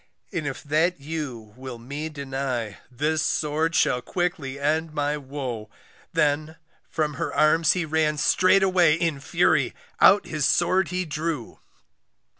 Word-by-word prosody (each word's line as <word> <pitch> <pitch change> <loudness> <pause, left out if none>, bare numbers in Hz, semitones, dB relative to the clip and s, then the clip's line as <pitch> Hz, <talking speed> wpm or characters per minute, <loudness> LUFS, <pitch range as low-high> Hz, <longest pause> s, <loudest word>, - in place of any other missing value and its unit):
And 165 -5 -2
if 135 - -5
that 155 +4 +1
you 140 -8 -6
will 130 -1 -8
me 140 +7 -6
deny, 135 -7 -4
This 150 +5 0
sword 155 +3 0
shall 125 - +2
quickly 160 -5 -3
end 155 +2 0
my 145 0 0
woe, 130 -6 -6 0.4
Then 155 0 0 0.3
from 155 -2 -1
her - - -1
arms 155 +1 +4
he 180 -2 -1
ran 155 -1 +1
straightway 185 0 +4
In 165 -4 -1
fury, - - +1 0.2
out 200 +2 +6
his 150 -3 0
sword 185 +3 +2
he 180 0 -2
drew. 155 -5 -4
150 Hz, 135 wpm, -25 LUFS, 140-165 Hz, 0.4 s, out